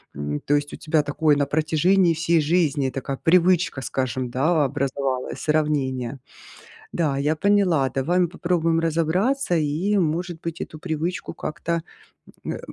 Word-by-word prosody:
М, 75 +1 -3
то 145 - -1
есть 145 0 -2
у - - -6
тебя 155 -1 +1
такое 145 +1 +1
на 140 - +2
протяжении 165 +4 +2
всей 165 +1 +2
жизни, 150 -4 +1
такая 135 0 -4
привычка, 180 -4 +3
скажем, 130 -1 -2
да, 150 +5 +2
образовалась- 135 -1 -2
сравнение. 140 -4 -1 0.7
Да, 150 -5 0
я 150 +3 +1
поняла. 180 -8 +2
Давай 170 +7 0
мы 175 - +2
попробуем 165 -2 0
разобраться, 175 - +1
и, 165 +7 0
может 170 0 -1
быть, 165 0 -5
эту 155 - -6
привычку 165 +2 -3
как-то, 170 +1 -3 0.6
м, - - -2
э, - - -6
155 Hz, 145 wpm, -23 LUFS, 140-170 Hz, 0.7 s, привычка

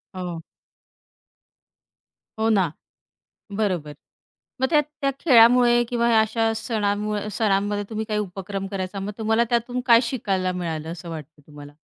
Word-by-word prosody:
हो. 175 -3 -5 2.0
हो 220 +1 +2
ना! 190 -7 +2 0.9
बरोबर. 180 -9 -1 0.7
मग 265 - +3
त्या 300 -2 +4
त्या 295 -1 -3
खेळामुळे 240 -3 +6
किंवा 235 -1 +1
अशा 225 +1 +1
सणामुळ 210 -2 -2
सणांमध्ये 205 -1 0
तुम्ही 220 -1 -3
काही 210 -1 -1
उपक्रम 195 0 -5
करायचा, 195 0 -4
मग 195 +2 -4
तुम्हाला 220 +1 +2
त्यातून 240 +1 0
काय 235 -2 +7
शिकायला 195 -7 -1
मिळालं 165 -3 -4
असं 170 0 -8
वाटतं 155 -2 -9
तुम्हाला? 145 -1 -12
210 Hz, 125 wpm, -23 LUFS, 185-230 Hz, 2.0 s, काय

